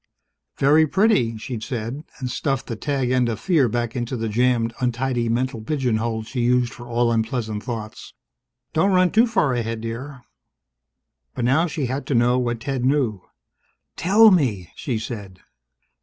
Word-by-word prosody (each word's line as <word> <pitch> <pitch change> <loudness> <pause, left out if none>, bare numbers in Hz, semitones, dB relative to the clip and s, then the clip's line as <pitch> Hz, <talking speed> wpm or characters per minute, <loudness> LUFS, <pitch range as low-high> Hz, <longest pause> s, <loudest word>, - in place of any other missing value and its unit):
"Very 150 +3 +4
pretty," 190 - +2
she'd 115 0 -6
said, 120 +3 -4
and 125 -3 -4
stuffed 135 0 -1
the 115 - -4
tag 135 +1 -1
end 125 -2 +2
of 110 -2 -3
fear 155 -10 +2
back 120 0 -2
into 120 0 -3
the 115 0 -2
jammed, 115 +1 +1
untidy 125 -1 -1
mental 120 0 -1
pigeon 125 -2 0
hole 110 0 -2
she 120 +3 -4
used 125 0 +2
for 120 - -11
all 120 0 +1
unpleasant 110 -2 -1
thoughts. 110 -3 -7 0.6
"Don't 180 +5 +2
run 185 -1 +4
too 230 +3 +4
far 185 - +1
ahead, 115 -2 -2
dear." 125 +4 -6 1.1
But 120 - -1
now 145 +8 +3
she 150 -4 -3
had 130 +3 -3
to 140 - 0
know 120 +2 +3
what 120 -2 -2
Ted 135 -2 -2
knew. 130 -7 +1 0.7
"Tell 205 +7 +6
me!" 115 - +1
she 125 -5 -3
said. 105 -5 -7
125 Hz, 165 wpm, -22 LUFS, 115-140 Hz, 1.1 s, Tell